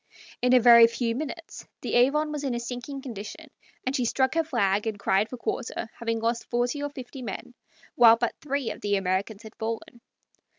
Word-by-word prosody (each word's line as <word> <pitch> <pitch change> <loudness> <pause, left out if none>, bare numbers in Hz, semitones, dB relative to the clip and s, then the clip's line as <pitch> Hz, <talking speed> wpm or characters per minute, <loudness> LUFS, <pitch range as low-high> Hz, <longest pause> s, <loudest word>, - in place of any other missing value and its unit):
In 250 +1 +4
a - - +7
very 235 -1 +8
few 230 0 -2
minutes 315 +4 -7
the - - -4
Avon 295 +5 +3
was 295 -1 -4
in 265 -3 -1
a - - -2
sinking 245 +3 -6
condition, 245 +6 -8 0.3
and 260 +2 -1
she 255 - +1
struck 260 +3 +1
her 330 0 +2
flag 210 -8 0
and 215 -2 -2
cried 200 +2 +1
for 250 - -7
quarter, 235 -1 -4
having 230 -1 -1
lost 230 +1 -2
forty 245 +4 0
or 290 - -2
fifty 265 -1 -9
men, 235 +1 -6 0.4
while 230 -1 +7
but 235 0 -1
three 280 -4 -2
of - - -9
the 205 -1 +1
Americans 195 +3 -1
had 220 - -11
fallen. 225 +1 -5
240 Hz, 200 wpm, -26 LUFS, 225-270 Hz, 0.4 s, very